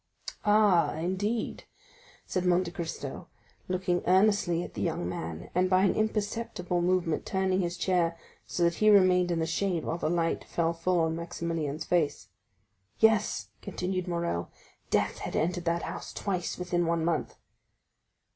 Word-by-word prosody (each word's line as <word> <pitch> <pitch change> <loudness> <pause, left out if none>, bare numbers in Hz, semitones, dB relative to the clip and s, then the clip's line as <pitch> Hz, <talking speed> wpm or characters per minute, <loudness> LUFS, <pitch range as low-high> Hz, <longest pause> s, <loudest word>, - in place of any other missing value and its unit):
"Ah, 205 -8 +4
indeed?" 190 +7 -2 0.6
said 185 - -1
Monte 180 -1 +2
Cristo, 170 -2 -5 0.4
looking 180 -1 0
earnestly 185 -2 +3
at - - -9
the - - -5
young 160 - -1
man, 85 -2 -5
and 185 +1 +2
by 185 0 +4
an 200 - +4
imperceptible 210 -4 -1
movement 175 -2 +1
turning 190 -1 0
his 175 0 -2
chair, 170 -3 +1 0.3
so 175 - -1
that 170 0 +3
he 215 +4 +3
remained 185 -3 +5
in 170 - 0
the 160 - 0
shade 170 +1 -1
while 165 - -2
the 155 - 0
light 165 -1 0
fell 170 -1 0
full 170 +1 +1
on 160 0 +1
Maximilian's 165 -2 -3
face. 165 -5 0 0.7
"Yes," 215 - +2
continued 185 0 -3
Morrel, 170 - -2 0.4
"death - - +1
had - - -5
entered 175 +2 0
that 170 0 0
house - - -6
twice 185 -3 -2
within 175 -1 0
one 165 -1 +1
month." 165 -3 -1
175 Hz, 150 wpm, -29 LUFS, 165-185 Hz, 0.7 s, remained